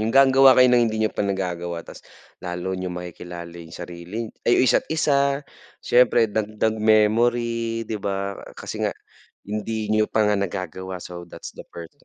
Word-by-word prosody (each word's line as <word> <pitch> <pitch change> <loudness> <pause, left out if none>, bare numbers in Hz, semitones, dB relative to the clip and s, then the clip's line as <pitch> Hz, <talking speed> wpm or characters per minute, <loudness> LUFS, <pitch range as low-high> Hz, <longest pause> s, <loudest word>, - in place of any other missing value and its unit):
yung 110 - 0
gagawa 135 -1 +7
kayo 125 0 +7
ng 120 -1 +5
hindi 110 0 -1
niyo 110 - +1
pa - - -4
nagagawa 90 -4 -2
ta's - - -12 0.4
lalo 90 +1 -4
niyong 90 -1 -4
makikilala 90 0 -8
yung 80 0 -12
sarili 90 +6 -6 0.2
ay 120 - +5
yung - - +4
isa't - - +2
isa 155 -3 +2 0.7
siyempre 120 -3 +4
dagdag 110 +1 -1
memory 115 +2 +2
'di 110 -1 -4
ba? 100 0 -3 0.2
Kasi - - -6
nga - - -1 0.5
hindi 105 +1 -3
niyo 110 0 +3
pa 110 -1 +2
nga 105 0 +2
nagagawa 95 -1 -4
so 85 -1 -8
that's - - -9
the - - -8
part. 85 -1 -9
105 Hz, 170 wpm, -23 LUFS, 90-115 Hz, 0.7 s, gagawa